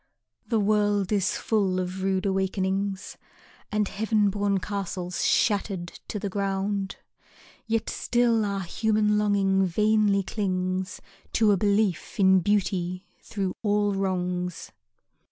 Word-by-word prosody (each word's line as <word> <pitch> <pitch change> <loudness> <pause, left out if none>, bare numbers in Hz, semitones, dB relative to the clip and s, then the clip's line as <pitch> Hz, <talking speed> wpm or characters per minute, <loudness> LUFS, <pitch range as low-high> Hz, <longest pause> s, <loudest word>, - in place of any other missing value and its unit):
The 225 - +1
world 205 -1 +1
is 205 -2 +1
full 195 -4 0
of 185 +1 -4
rude 190 0 0
awakenings 190 0 -1 0.5
And 210 -1 +1
heaven 210 0 +1
born 200 0 0
castles 185 -1 -4
shattered 195 -4 0
to - - -4
the 205 - -3
ground, 195 0 -2 0.7
Yet 225 -1 0
still 240 -2 +1
our 200 -1 -2
human 210 +3 +1
longing 195 -2 +2
vainly 210 +2 +2
clings 185 -2 -2 0.3
To 220 -2 +4
a 200 - +3
belief 200 -2 0
in 190 -1 +6
beauty 185 -1 0 0.2
through 195 -5 -3
all 205 -1 +1
wrongs. 180 -2 -2
200 Hz, 120 wpm, -26 LUFS, 190-210 Hz, 0.7 s, in